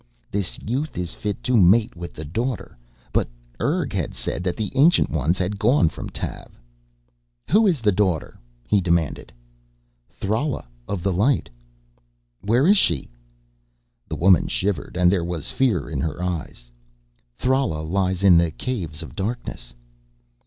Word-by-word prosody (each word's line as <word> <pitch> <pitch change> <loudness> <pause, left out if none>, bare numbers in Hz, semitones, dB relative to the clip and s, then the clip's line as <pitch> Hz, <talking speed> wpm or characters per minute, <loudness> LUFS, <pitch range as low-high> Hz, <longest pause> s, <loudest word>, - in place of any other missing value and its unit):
"This 100 -2 -2
youth 135 +8 -2
is 90 -1 -3
fit 105 -2 -4
to 125 - +1
mate 105 +2 +5
with 85 0 -7
the 80 - -7
Daughter." 115 - -3 0.4
But - - +1 0.3
Urg 155 -2 0
had 90 -6 -2
said - - -3
that 90 -2 -1
the 110 -2 -2
Ancient 145 +6 +4
Ones 80 +4 +1
had 95 +2 -2
gone 120 - +4
from - - -7
Tav. - - -7 0.9
"Who 215 +4 +5
is 165 -9 +1
the 105 -2 +4
Daughter?" 95 -5 0 0.3
he 100 +10 +3
demanded. 85 -5 0 0.8
"Thrala 115 - -2 0.2
of 95 -4 -3
the 95 - +1
Light." 105 - +1 0.9
"Where 115 +8 +2
is 200 +2 +6
she?" 75 -7 +1 1.0
The - - -4
woman 90 +1 +4
shivered 95 -3 -2
and 90 -1 +5
there 95 -3 +1
was 85 -3 -2
fear 115 - +1
in - - -4
her 80 +2 -3
eyes. 75 -9 -5 0.7
"Thrala 130 - +1
lies 95 +1 0
in 90 -4 +7
the 85 -1 +2
Caves 85 -6 -4
of 70 -6 -11
Darkness." 95 - -4
95 Hz, 150 wpm, -23 LUFS, 85-120 Hz, 1.0 s, in